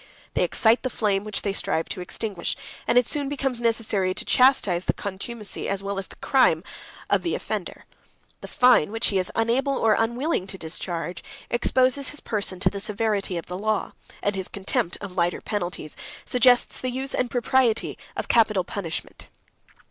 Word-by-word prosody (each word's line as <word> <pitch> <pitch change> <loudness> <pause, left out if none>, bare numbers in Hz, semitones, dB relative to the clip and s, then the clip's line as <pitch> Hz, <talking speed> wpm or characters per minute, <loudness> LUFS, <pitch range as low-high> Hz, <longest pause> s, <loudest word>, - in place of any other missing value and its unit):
They - - +2
excite 230 +1 +4
the 255 - -2
flame 205 -4 0
which 210 -1 -3
they 200 - -1
strive 165 -4 -1
to 185 - -5
extinguish; 190 0 -3 0.3
and - - +3
it 245 - +6
soon 285 -2 0
becomes 270 -4 -1
necessary 215 -5 +1
to - - -3
chastise 205 -9 +4
the - - +1
contumacy, 205 +2 -3
as 195 0 -2
well 200 0 -2
as 195 - -4
the - - -14
crime, 185 - +3 0.4
of - - +2
the 340 - -1
offender. - - -5 0.6
The - - -7
fine, 250 -8 +4
which 225 +1 0
he 195 - +1
is 185 - -1
unable 255 +5 +1
or 220 -1 +3
unwilling 235 - 0
to 190 - -6
discharge, 170 0 -4 0.3
exposes 255 +3 +2
his 295 - -5
person 200 -4 -3
to - - +4
the 200 - -5
severity 205 -3 -1
of 170 - -5
the 180 +1 -6
law; 215 0 -1 0.3
and 205 0 +1
his 190 -1 0
contempt 190 -3 -2
of 195 -3 -7
lighter 175 -1 +1
penalties 175 -7 -3 0.3
suggests 245 0 +4
the 255 - -1
use 265 +2 -1
and 250 - 0
propriety 245 -1 +1 0.2
of - - -3
capital 215 -5 +3
punishment. 180 -2 -6
215 Hz, 180 wpm, -25 LUFS, 190-245 Hz, 0.6 s, it